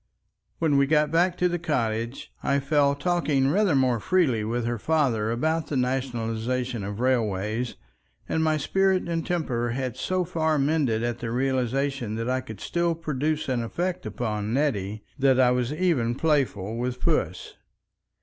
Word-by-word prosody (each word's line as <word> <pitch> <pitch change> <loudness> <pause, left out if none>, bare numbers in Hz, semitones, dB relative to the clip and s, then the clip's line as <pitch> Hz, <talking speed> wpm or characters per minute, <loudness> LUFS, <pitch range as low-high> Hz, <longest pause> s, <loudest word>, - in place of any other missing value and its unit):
When 155 -4 +2
we 140 0 +4
got 150 0 +3
back 175 +2 +2
to 180 - +3
the 175 0 -2
cottage, 120 -6 -2
I 140 - +1
fell 140 0 +2
talking 150 -4 +1
rather 195 -4 +3
more 130 -3 +2
freely 135 - +2
with 115 +2 -2
her 120 -1 -2
father 130 -8 +1
about 160 +7 0
the 145 - -2
nationalization 125 -2 -1
of 100 +2 -5
railways, 115 -2 0 0.5
and 160 - 0
my 155 -1 +2
spirits 190 +5 +1
and 165 -1 -1
temper 130 -9 -1
had 130 -2 -3
so 185 -1 -1
far 160 -2 0
mended 140 -6 +1
at 120 0 -2
the 115 - -4
realization 130 -1 -1
that 115 +3 -2
I 130 0 0
could 110 -3 -10
still 170 -1 0
produce 155 -1 -2
an 125 -3 0
effect 175 +7 -3
upon 105 0 -2
Nettie, 105 -8 -1 0.2
that 135 -1 +4
I 125 -1 +5
was 125 0 0
even 150 -9 +1
playful 125 -9 0
with 125 +1 -2
Puss. - - -1
130 Hz, 160 wpm, -26 LUFS, 115-155 Hz, 0.5 s, I